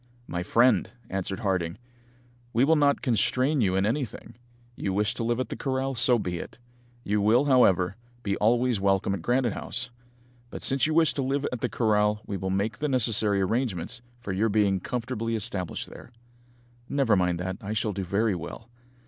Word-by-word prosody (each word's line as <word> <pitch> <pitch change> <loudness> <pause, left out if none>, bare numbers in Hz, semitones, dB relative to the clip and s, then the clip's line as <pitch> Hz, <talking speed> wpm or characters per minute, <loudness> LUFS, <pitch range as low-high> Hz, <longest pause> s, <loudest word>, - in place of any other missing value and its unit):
"My 90 - -4
friend," 120 +4 +3 0.2
answered 95 0 -3
Harding, 95 -3 -1 0.8
"we 120 +3 +4
will 160 +3 +4
not 145 -2 +2
constrain 130 +3 +2
you 95 -4 +2
in 95 +1 +2
anything. 120 -1 -3 0.4
You 95 - -2
wish 105 +2 +1
to - - -4
live 120 +1 0
at 130 -3 -2
the - - -4
corral, 135 0 -2
so 125 0 +3
be 90 -5 -3
it. - - -9 0.5
You 105 -1 0
will, 115 +7 +4
however, 100 -8 +3 0.3
be 100 -3 0
always 120 +1 +2
welcome 95 0 +2
at 100 - -4
Granite 120 -2 +1
House. 120 +2 -4 0.6
But - - -8
since 135 +2 +2
you 155 - -1
wish 165 -1 +4
to 140 - -2
live 135 +2 -1
at 125 -2 -5
the - - 0
corral 105 -2 +1
we 100 - -4
will 95 0 -3
make 100 +4 -1
the 150 0 -1
necessary 110 -5 +3
arrangements 115 +2 -2 0.2
for 100 - -5
your 110 +4 +1
being 100 -2 +2
comfortably 115 +1 -3
established 95 -5 -4
there." - - -12 0.8
"Never 135 -6 +2
mind 90 -2 +1
that, 95 +1 -3
I 105 +1 -4
shall 110 -1 -1
do 95 0 -3
very 100 +4 +1
well." 90 +7 -7
110 Hz, 185 wpm, -27 LUFS, 95-125 Hz, 0.8 s, we